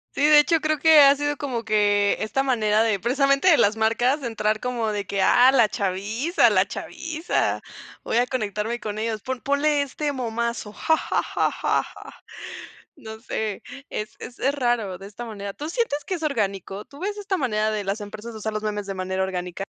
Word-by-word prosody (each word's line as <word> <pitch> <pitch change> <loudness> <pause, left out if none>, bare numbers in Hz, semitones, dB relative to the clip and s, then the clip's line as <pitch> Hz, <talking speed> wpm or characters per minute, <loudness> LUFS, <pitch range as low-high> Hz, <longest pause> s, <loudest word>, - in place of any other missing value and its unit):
Sí. - - -2
De 300 0 +8
hecho, 325 +2 +3
creo 310 -1 0
que 315 -1 +7
ha 280 0 +7
sido 290 0 -2
como 250 -5 -3
que 205 -2 +2
esta 220 +5 -1
manera 220 -5 +2
de, 220 -3 +1
precisamente 275 - +2
de 335 -5 +7
las 205 +2 +3
marcas, 240 +6 +1
entrar 215 -2 -1
como 240 -3 -2
de 205 -1 -3
que 195 0 -2
ah, 250 +6 +6
la 235 -5 +4
chaviza, 210 - +1
la - - +3
chaviza, 325 0 -2 0.4
voy 230 - -1
a 245 - +4
conectarme 225 -2 -3
con 210 -1 -5
ellos. 220 -1 -2
Pon 260 -1 -4
ponle 285 +1 +1
este 290 +2 -3
momazo. 235 -4 -3
Ja, 320 -1 +1
ja, - - -1
ja, - - -1
ja, - - 0
ja. - - -13 0.7
No 220 0 -10
sé, 220 -3 -4 0.3
es 215 0 -5
es 245 - -10
es 275 +2 +1
raro, 240 -8 0
de 195 +2 -10
esta 215 +4 -8
manera. 200 -3 -6
¿Tú 300 +7 -6
sientes 325 -8 -1
que - - -3
es 335 -3 -4
orgánico? 200 - -2
¿Tú 280 - -15
ves 410 +4 -3
esta 400 -2 -2
manera 215 - 0
de 210 -1 -2
las 195 +2 -2
empresas 215 +2 -8
usar 220 0 -4
los 215 0 -3
memes 210 -1 -3
de 195 - -4
manera 190 0 -2
orgánica? 180 0 -4
230 Hz, 200 wpm, -24 LUFS, 210-280 Hz, 0.7 s, De